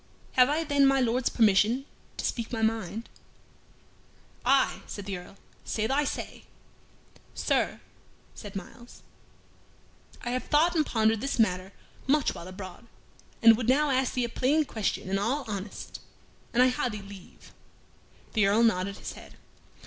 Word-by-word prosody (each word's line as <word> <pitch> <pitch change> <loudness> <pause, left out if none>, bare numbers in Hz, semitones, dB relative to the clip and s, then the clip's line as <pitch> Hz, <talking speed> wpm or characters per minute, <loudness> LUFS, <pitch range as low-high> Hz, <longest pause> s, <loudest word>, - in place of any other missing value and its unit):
"Have 255 0 +5
I 310 +3 +1
then 285 -3 +4
my 270 0 +4
Lord's 250 0 +1
permission 225 +4 +3 0.3
to - - -3
speak 235 -2 -2
my 225 -2 -2
mind?" 220 0 -1 1.4
"Aye," - - +3
said 205 - -7
the 200 -1 -3
Earl, 180 +2 -10 0.3
"say 220 - -2
thy 275 +5 +1
say." - - -5 0.9
"Sir," - - 0 0.5
said 205 -2 -10
Myles, 235 +5 -10 1.2
"I 240 - -2
have 255 +1 -2
thought 325 +4 +3
and 315 - +4
pondered 220 -1 +2
this 275 - -2
matter 185 -4 +1 0.4
much 290 +1 +2
while 170 - -9
abroad, 185 +4 -9 0.6
and 230 0 +9
would 235 +1 -2
now 290 +2 +3
ask 260 -1 +1
thee 250 - +1
a - - -5
plain 290 +6 +2
question 220 -6 -2
in 195 +1 0
all 260 +8 -1
honest 200 -1 -6 0.5
an 245 - +3
I 255 - +6
ha' 250 0 -1
thy 210 -2 -6
leave." 195 -2 -13 0.8
The 210 -3 +3
Earl 215 +4 +4
nodded 200 -3 +1
his - - -7
head. - - -13
230 Hz, 155 wpm, -28 LUFS, 200-260 Hz, 1.4 s, and